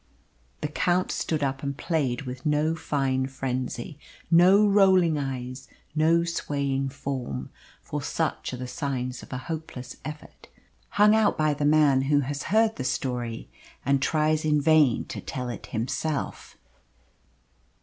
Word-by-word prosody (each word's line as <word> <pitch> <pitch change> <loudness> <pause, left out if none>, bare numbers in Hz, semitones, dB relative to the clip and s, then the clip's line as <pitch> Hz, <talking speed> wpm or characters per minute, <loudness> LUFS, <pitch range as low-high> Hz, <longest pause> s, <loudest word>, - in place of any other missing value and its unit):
The - - -1
Count 175 +4 0
stood 155 -3 -1
up 135 -1 -1
and 140 -1 -3
played 145 -8 -1
with 130 0 -7
no 150 +1 +2
fine 135 -4 -1
frenzy, 130 +1 -4 0.3
no 185 +5 +6
rolling 190 -6 +4
eyes, 130 -1 -5 0.3
no 160 +2 +3
swaying 140 -5 -1
form; 130 - -5 0.3
for - - -4
such - - -2
are 125 - -5
the 125 - -5
signs 130 -1 -3
of - - -13
a 125 - -3
hopeless 130 -4 -6
effort, 150 0 -9 0.4
hung 210 +1 +5
out 220 -1 +3
by 155 -1 +2
the 145 0 -2
man 145 -3 +4
who 145 -1 +4
has 140 +1 -4
heard 220 +2 +3
the 130 - -3
story 125 -3 -3 0.4
and 140 0 +2
tries 155 +1 +1
in 150 -1 +3
vain 150 -4 +4
to - - -7
tell 125 -2 -5
it 120 - -7
himself. 135 +6 -3
145 Hz, 145 wpm, -26 LUFS, 130-160 Hz, 0.4 s, no